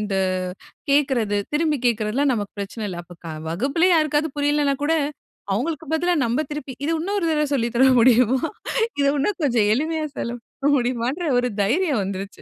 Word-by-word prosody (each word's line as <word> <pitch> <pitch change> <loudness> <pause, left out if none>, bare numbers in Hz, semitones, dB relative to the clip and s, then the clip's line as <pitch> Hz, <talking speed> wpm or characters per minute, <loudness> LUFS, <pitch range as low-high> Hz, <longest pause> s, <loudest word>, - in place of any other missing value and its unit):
இந்த 205 -2 -2 0.7
கேட்கிறது 260 -8 +2 0.2
திரும்பி 305 -1 +1
கேட்கிறதெல்லாம் 235 +4 +1
நமக்கு 205 -3 -4
பிரச்சன 200 +2 -5
இல்ல. 175 -2 -6
அப்ப 170 -1 -10 0.2
வகுப்பிலே 275 - +1
யாருக்காவது 305 0 +1
புரியலனா 290 -1 +2
கூட 315 - +2 0.6
அவங்களுக்கு 305 +9 -2
பதிலா 350 +3 +2
நம்ம 240 +6 0
திருப்பி, 290 -3 -5
இத 300 - 0
இன்னொரு 395 +3 -1
தடவை 300 -1 +2
சொல்லித் 235 -3 0
தர 260 +3 +5
முடியுமா? 250 +1 +5 0.6
இத 280 - +3
இன்னும் 365 +8 -1
கொஞ்சம் 235 -7 +2
எளிமையா 310 +5 -1
செலவு 240 +1 -4 0.2
பண்ண 285 - +3
முடியுமான்ற? 250 +6 -1
ஒரு 250 - 0 0.2
தைரியம் 285 - +1
வந்துருச்சு. 195 +1 -6
265 Hz, 155 wpm, -22 LUFS, 225-300 Hz, 0.7 s, தர